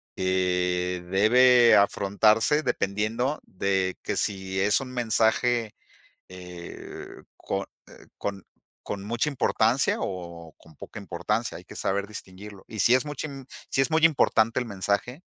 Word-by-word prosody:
que 90 -1 0
debe 120 +5 +6
afrontarse 105 +7 +3
dependiendo 115 +4 -1
de 95 0 -1
que, - - -3
si 95 -2 -2
es 105 +2 +3
un 130 -1 -7
mensaje, 115 -1 +1 0.6
eh, 90 -2 -9 0.3
con, 95 0 -3 0.2
eh, - - -16
con 100 -2 -5 0.4
con 100 -1 -5
mucha 115 +6 -1
importancia 125 -2 +1
o 85 -3 -6
con 80 -1 -19
poca 110 - -10
importancia, 100 +5 -3
hay - - -12
que - - -12
saber 100 +1 -1
distinguirlo. 100 -1 -10
Y 110 - -6
si 120 - +5
es 130 - -1
mucha 150 +1 -5 0.4
si - - +1
es 135 +4 +1
muy 160 0 +3
importante 115 -8 +3
el 125 - -2
mensaje, 105 - -2
105 Hz, 135 wpm, -26 LUFS, 95-120 Hz, 0.6 s, debe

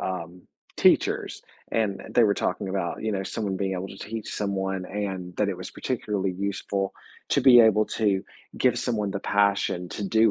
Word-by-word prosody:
um, 90 -1 -5 0.3
teachers, - - +2 0.3
and 105 -4 0
they 120 - +5
were 100 - +3
talking 95 +1 -2
about, 95 -3 -2
you 110 -1 -1
know, 95 -1 -1
someone 100 -1 -3
being 95 -1 -1
able 95 +1 -3
to - - -10
teach 110 0 -5
someone 95 -2 -2
and 95 -3 -4
that - - +1
it - - -2
was - - -7
particularly 100 -2 -2
useful 100 +1 -2 0.4
to - - +3
be 125 -3 +8
able 110 -1 +5
to 100 -3 0 0.3
give - - +3
someone 105 -4 -1
the 100 - -3
passion 100 -3 +1
to 100 +3 -4
do 110 +2 +4
100 Hz, 180 wpm, -26 LUFS, 95-105 Hz, 0.4 s, be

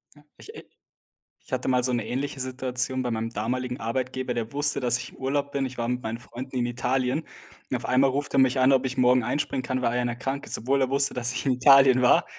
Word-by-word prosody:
Ja. 145 - -20
Ich, 440 - -12
äh - - -10 0.8
ich - - -18
hatte 130 0 -2
mal 125 -1 +2
so 125 0 +1
'ne 120 -3 -2
ähnliche 135 +2 -3
Situation 130 0 -2
bei 120 - -2
meinem 115 0 -2
damaligen 125 +3 -3
Arbeitgeber, 130 +2 -3
der 115 -1 -4
wusste, 145 +1 +3
dass 125 -2 +2
ich - - -8
im - - -18
Urlaub 140 +2 -1
bin. 140 -1 -1
Ich 125 - -11
war 120 -1 -2
mit 125 +1 -2
meinen 110 0 -4
Freunden 125 +2 -9
in 120 - 0
Italien, 125 +4 -1 0.5
und - - 0
auf - - -9
einmal 130 +2 +3
ruft 140 +2 -3
er - - +3
mich 130 0 +3
an, 130 +1 +5
ob 135 -1 +3
ich 130 0 -4
morgen 125 0 +4
einspringen 135 +2 -2
kann, 130 0 -3
weil 115 - +2
einer 120 -1 -1
krank 135 +3 -4
ist, - - -3
obwohl 135 +4 0
er 130 - +1
wusste, 140 0 +2
dass 125 0 +1
ich 130 - -4
in 135 - +2
Italien 130 0 +6
war. 125 - +4
130 Hz, 250 wpm, -25 LUFS, 125-135 Hz, 0.8 s, Italien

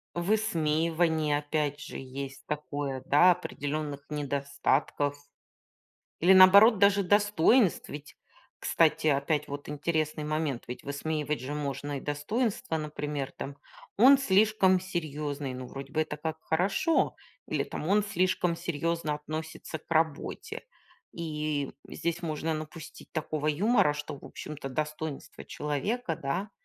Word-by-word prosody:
Высмеивание, 165 -5 +1
опять 145 -1 -1
же, - - -7
есть 135 +1 -7
такое, 145 -3 -3
да, 175 +6 +6
определённых 145 -4 -3
недостатков. 140 0 0 1.0
Или, 180 +3 +5
наоборот, 200 +4 +8
даже 200 0 +4
достоинств, 205 +2 +3
ведь, 145 0 -9 0.4
кстати, 160 -1 +2
опять 150 +1 +1
вот 145 0 -7
интересный 155 0 -1
момент: 150 -4 -2
ведь 125 - -7
высмеивать 150 0 -2
же 130 +3 -4
можно 145 -1 -3
и - - -8
достоинства, 160 - -1
например, 150 -2 -4
там: 140 +1 -7 0.4
"Он 265 +6 +8
слишком 200 -5 +4
серьёзный". 150 -6 -4
Ну, 130 0 -6
вроде 135 +1 -8
бы 155 - +1
это 155 -1 -2
как 160 +1 -4
хорошо. 195 - +1 0.3
Или - - 0
там: - - -5
"Он 205 +4 +4
слишком 185 -3 +1
серьёзно 165 -1 -1
относится 155 +1 -6
к - - -30
работе". 160 -2 -1 0.5
И 150 -3 -3 0.2
здесь 170 0 -3
можно 160 0 -2
напустить 155 +1 -9
такого 155 -1 -2
юмора, 160 +2 +3
что, 150 -1 -6
в - - -16
общем-то, 150 -2 -7
достоинство 155 +1 -5
человека, 165 - -2
да, 175 +10 -3
155 Hz, 125 wpm, -29 LUFS, 145-175 Hz, 1.0 s, наоборот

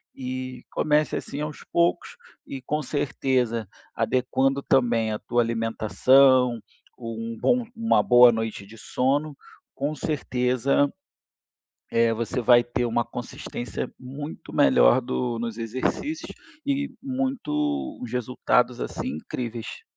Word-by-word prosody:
e 130 -1 -5
comece 150 0 +1
assim 140 - -5
aos 150 -1 -5
poucos, 170 0 +2 0.4
e 135 - -6
com 150 +3 -1
certeza, 130 -7 -1 0.3
adequando 135 +2 +1
também 115 -4 +2
a 105 - -3
tua 120 +3 +1
alimentação, 120 +2 +3 0.4
um 115 0 -5
bom 250 -1 +2
uma 225 0 +2
boa 125 0 +8
noite 110 -3 -3
de 110 +3 -14
sono, 140 +7 0 0.4
com 145 +3 -2
certeza, 135 -1 0 1.0
eh, 115 0 +3
você 115 +2 -2
vai 120 0 +5
ter 120 0 -1
uma 120 0 0
consistência 120 0 -6
muito 140 +4 -8
melhor - - +5
do 90 - -2
nos 115 -1 -4
exercícios 130 - -3 0.3
e 280 0 -1
muito 290 +3 -2
os 120 -1 -6
resultados 125 0 +1
assim, - - -4
incríveis. 115 +7 -6
125 Hz, 115 wpm, -25 LUFS, 115-145 Hz, 1.0 s, boa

